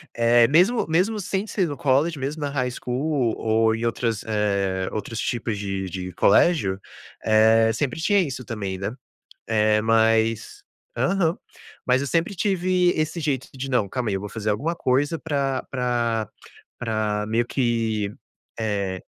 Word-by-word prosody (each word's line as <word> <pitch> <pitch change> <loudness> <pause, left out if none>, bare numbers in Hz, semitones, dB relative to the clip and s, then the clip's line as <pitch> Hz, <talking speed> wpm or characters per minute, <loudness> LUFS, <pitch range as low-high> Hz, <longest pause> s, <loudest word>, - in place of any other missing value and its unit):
Eh, 120 0 +5
mesmo 180 - +3
mesmo 185 +7 +1
sem 195 +1 -2
ser 195 -4 -1
no 145 -2 -5
college, 145 +5 +2
mesmo 140 +3 -4
na 145 - -1
high 130 -3 -1
school 125 0 -1
ou 110 0 +2
em 115 +1 -3
outras, 115 -2 -1
eh, 100 -3 0
outros 110 +1 -4
tipos 115 -3 -2
de 95 -1 -3
de 90 0 -5
colégio, 100 - +3 0.4
eh, 110 +1 +5
sempre 130 +5 -2
tinha 205 +4 +3
isso 135 -8 -2
também, 100 -4 -4
né, 95 +3 -3 0.6
eh, 110 -1 +3
mas 115 0 +1 0.3
aham. 165 +6 +1 0.5
Mas 130 +1 +3
eu 140 - -2
sempre 170 +6 0
tive 185 -1 +2
esse 155 +2 -1
jeito 140 -5 -2
de: 135 +1 -5
"Não. 120 -6 +1
Calma 120 +1 -2
aí, 100 - 0
eu - - -2
vou 105 - -6
fazer 110 0 -3
alguma 150 +12 -1
coisa 145 +3 0
pra 140 -4 -1
pra 120 -4 -1 0.5
pra 110 -2 -1
meio 115 +2 +1
que, 115 -5 -1 0.5
eh", 100 -4 -2
120 Hz, 155 wpm, -23 LUFS, 110-145 Hz, 0.6 s, Eh